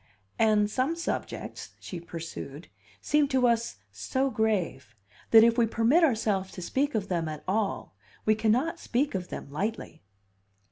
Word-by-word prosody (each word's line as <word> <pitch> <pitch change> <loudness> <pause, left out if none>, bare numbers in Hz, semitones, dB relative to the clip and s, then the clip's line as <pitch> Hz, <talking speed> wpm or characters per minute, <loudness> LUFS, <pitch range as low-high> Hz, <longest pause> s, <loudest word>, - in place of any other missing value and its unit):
"And 215 -2 +4
some 255 +9 0
subjects," 335 - -5
she 180 - -7
pursued, 165 -2 -8 0.3
"seem 295 -1 +2
to 260 -2 +2
us 235 - +1 0.2
so 260 - -1
grave 185 - -1 0.3
that 225 -1 +8
if 235 +1 +4
we 230 - +4
permit 230 +10 +3
ourselves 215 -9 +1
to 185 - -7
speak 280 +9 0
of 205 -2 -1
them 170 -4 -1
at 155 -1 -7
all 200 +1 -1 0.3
we 215 - +5
cannot 245 +10 +1
speak 270 +5 0
of 185 -2 -3
them 140 - -7
lightly." 210 +9 -4
220 Hz, 150 wpm, -28 LUFS, 185-255 Hz, 0.3 s, that